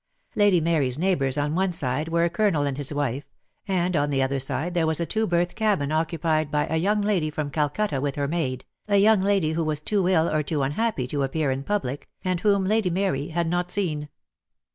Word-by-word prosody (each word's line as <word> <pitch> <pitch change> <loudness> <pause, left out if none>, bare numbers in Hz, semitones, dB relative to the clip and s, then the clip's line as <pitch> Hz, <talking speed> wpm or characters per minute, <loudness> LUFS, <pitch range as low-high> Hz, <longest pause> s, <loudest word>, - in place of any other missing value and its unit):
Lady 205 -4 +4
Mary's 155 -6 +1
neighbours 150 -6 +1
on 145 +1 0
one 185 +2 +1
side 150 -1 -2
were 170 0 +2
a - - +1
Colonel 175 -5 +1
and 140 -2 -1
his 145 0 -4
wife, 140 -1 -2 0.4
and 180 -2 0
on 145 -1 +1
the 140 -2 0
other 135 +1 -1
side 140 +6 -1
there 170 -2 +1
was 160 0 0
a 170 - 0
two 220 +5 -1
berth 175 0 +1
cabin 205 -10 0
occupied 155 -1 0
by 150 0 +1
a 160 - -1
young 205 +5 +1
lady 190 -7 +1
from 150 -1 -4
■Calcutta 150 +1 -1
with 140 -1 -2
her 145 -1 -1
maid, 135 -6 -2 0.2
a 200 -1 +3
young 210 0 +5
lady 195 -5 +2
who 165 +1 -1
was 155 -1 -2
too 195 -2 +1
ill 165 -3 +3
or 155 -2 +1
too 150 -1 -1
unhappy 145 - -1
to 140 +3 -2
appear 140 +1 0
in 130 +1 -2
public, 145 -8 -3
and 185 -2 0
whom 200 0 +2
Lady 215 -1 +2
Mary 175 -6 -1
had 170 0 -1
not 175 +1 -1
seen. 155 -7 -2
160 Hz, 220 wpm, -25 LUFS, 145-185 Hz, 0.4 s, young